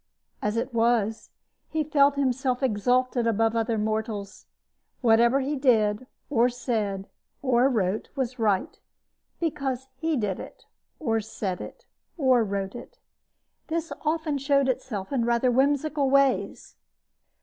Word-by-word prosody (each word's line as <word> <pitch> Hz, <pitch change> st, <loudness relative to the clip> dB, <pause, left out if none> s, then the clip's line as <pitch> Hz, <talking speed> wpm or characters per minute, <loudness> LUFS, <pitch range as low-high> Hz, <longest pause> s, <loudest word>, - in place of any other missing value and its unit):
As 210 Hz, +2 st, -1 dB
it 240 Hz, +2 st, -2 dB
was, 225 Hz, -2 st, +1 dB, 0.4 s
he 315 Hz, -1 st, 0 dB
felt 285 Hz, -1 st, +3 dB
himself 260 Hz, -1 st, 0 dB
exalted 245 Hz, +1 st, +1 dB
above 225 Hz, 0 st, +2 dB
other 225 Hz, 0 st, 0 dB
mortals. 215 Hz, -1 st, -3 dB, 0.5 s
Whatever 235 Hz, +2 st, +4 dB
he 280 Hz, +3 st, -1 dB
did 235 Hz, -4 st, +2 dB, 0.2 s
or 245 Hz, -3 st, +3 dB
said 215 Hz, -6 st, -2 dB, 0.4 s
or 255 Hz, 0 st, +3 dB
wrote 210 Hz, -4 st, -1 dB
was 255 Hz, -2 st, -3 dB
right 205 Hz, -4 st, 0 dB, 0.6 s
because 270 Hz, -6 st, -2 dB
he 320 Hz, +2 st, 0 dB
did 205 Hz, -5 st, -1 dB
it -, -, -11 dB, 0.3 s
or 225 Hz, -7 st, 0 dB
said 200 Hz, -3 st, -4 dB
it -, -, -10 dB, 0.3 s
or 260 Hz, -6 st, +4 dB
wrote 195 Hz, -2 st, -3 dB
it. -, -, -10 dB, 0.7 s
This 330 Hz, 0 st, -2 dB
often 310 Hz, -2 st, 0 dB
showed 275 Hz, 0 st, +2 dB
itself 250 Hz, -6 st, -3 dB
in 250 Hz, -4 st, +1 dB
rather 235 Hz, +2 st, +2 dB
whimsical 285 Hz, +2 st, +2 dB
ways. 275 Hz, 0 st, +1 dB
245 Hz, 125 wpm, -26 LUFS, 220-275 Hz, 0.7 s, Whatever